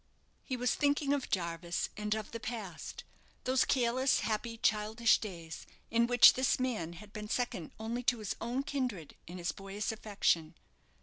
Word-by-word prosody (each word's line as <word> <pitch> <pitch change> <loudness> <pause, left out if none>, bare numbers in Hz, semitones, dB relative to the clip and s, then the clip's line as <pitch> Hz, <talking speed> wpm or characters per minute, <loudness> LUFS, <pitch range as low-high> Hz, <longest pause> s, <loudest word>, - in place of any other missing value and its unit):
He 255 - -3
was 250 0 +1
thinking 285 -1 +2
of 280 -3 -2
Jarvis 170 -1 -1
and 210 0 -1
of 215 -1 -5
the 230 - -5
past 220 -7 -6 0.4
those 260 0 +3
careless, 255 +1 +2
happy, 230 +1 -2
childish 220 +1 +3
days, 170 -6 -7 0.2
in 235 +1 +3
which 245 0 +8
this 260 0 +1
man 220 -10 -1
had 205 +4 -12
been 210 -1 -6
second 215 -11 -1
only 230 +2 -3
to 245 - +3
his 215 -3 -3
own 245 +4 -1
kindred 250 - -3
in 175 +2 -7
his 175 0 -1
boyish 195 +2 -4
affection. 195 -7 0
220 Hz, 165 wpm, -33 LUFS, 195-245 Hz, 0.4 s, which